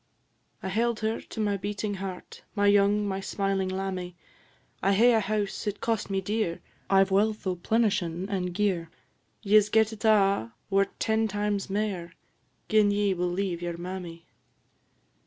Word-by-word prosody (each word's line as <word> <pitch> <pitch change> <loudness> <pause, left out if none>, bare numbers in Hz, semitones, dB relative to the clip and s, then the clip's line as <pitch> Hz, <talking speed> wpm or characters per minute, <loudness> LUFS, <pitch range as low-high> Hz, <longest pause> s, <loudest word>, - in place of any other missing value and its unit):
"I 190 - -2
held 230 +3 0
her 220 +1 -1
to - - -10
my 205 -2 +1
beating 205 +1 -3
heart, 190 -1 -7
My 205 -1 +2
young, 205 +1 +4
my 190 -1 -2
smiling 195 -1 -1
lammie! 185 -2 -4 0.7
'I 195 +2 +3
hae 235 +5 +5
a 225 - +4
house, 210 0 -2
it 205 - -2
cost 225 -3 -1
me 195 -1 0
dear; 205 -3 -1 0.3
I 195 0 +6
've 195 - -6
wealth 210 +2 +1
o' 185 -1 0
plenishin' 190 -3 0
and 185 -3 -2
gear; 180 -3 0 0.5
Ye 210 +1 +6
'se 210 - -4
get 220 0 +3
it 215 - -10
a', 195 - +3 0.2
were 195 0 +4
't 195 - -26
ten 220 0 +1
times 205 -1 -2
mair, 190 -4 -2 0.5
Gin 215 -2 +4
ye 205 -1 +2
will 180 0 -1
leave 180 -1 -2
your 175 -1 -4
mammy.' 175 -2 -7
200 Hz, 170 wpm, -27 LUFS, 185-210 Hz, 0.7 s, I